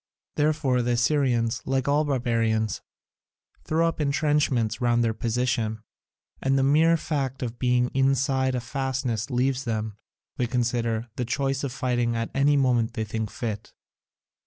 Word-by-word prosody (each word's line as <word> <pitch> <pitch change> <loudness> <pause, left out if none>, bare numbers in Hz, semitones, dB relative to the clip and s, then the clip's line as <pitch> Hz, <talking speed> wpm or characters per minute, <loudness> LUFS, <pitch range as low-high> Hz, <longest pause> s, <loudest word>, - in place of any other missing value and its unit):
Therefore 150 -4 +1
the 120 0 0
Assyrians, 120 -2 +1
like 135 0 -1
all 145 +2 +3
barbarians, 115 -6 0 0.8
throw 165 +1 +1
up 165 - -2
entrenchments 145 -6 +1
round 120 -1 +3
their 115 -1 +1
position, 115 -2 -1 0.6
and 135 0 +2
the 135 - +2
mere 160 +4 +4
fact 135 -5 -3
of 120 -1 -5
being 125 -1 +2
inside 135 0 +2
a 125 - -1
fastness 130 -2 -2
leaves 130 +1 0
them, 110 -3 -3 0.4
they 125 - 0
consider, 120 -1 -1
the 125 - -1
choice 135 +3 -1
of 140 - -2
fighting 120 -2 0
at 115 0 -2
any 145 +1 +3
moment 120 -4 +2
they 110 - -1
think 110 0 -3
fit. 110 -1 -5
125 Hz, 145 wpm, -25 LUFS, 115-135 Hz, 0.8 s, mere